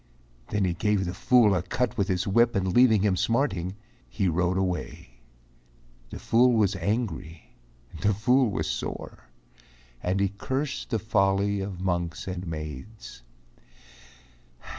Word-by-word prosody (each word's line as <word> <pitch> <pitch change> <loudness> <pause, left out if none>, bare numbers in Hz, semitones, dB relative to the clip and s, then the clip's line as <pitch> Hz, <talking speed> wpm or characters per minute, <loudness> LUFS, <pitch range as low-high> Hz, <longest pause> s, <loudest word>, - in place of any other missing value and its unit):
Then 105 -2 0
he 90 - 0
gave 100 +2 0
the 90 - -3
fool 115 +1 +4
a 90 - +1
cut 115 +6 -2
with 100 - 0
his 95 -3 0
whip 115 +4 +3
And 95 -2 0
leaving 110 -4 +5
him 100 -3 +2
smarting, 95 -5 0 0.3
he 100 -3 -1
rode 90 +2 +1
away. 90 -9 -4 0.9
The - - -7
fool 125 +2 +3
was 105 -3 +2
angry, 90 -5 -3 0.5
the 105 - +3
fool 125 +4 +3
was 100 - -2
sore, - - -5 0.8
And 95 +2 -1
he 100 0 +2
cursed 130 +8 -4
the 115 - 0
folly 100 -1 +1
of 95 -2 -6
monks 85 -3 -2
and 90 -1 -5
maids. 75 - -8
95 Hz, 140 wpm, -26 LUFS, 90-110 Hz, 0.9 s, leaving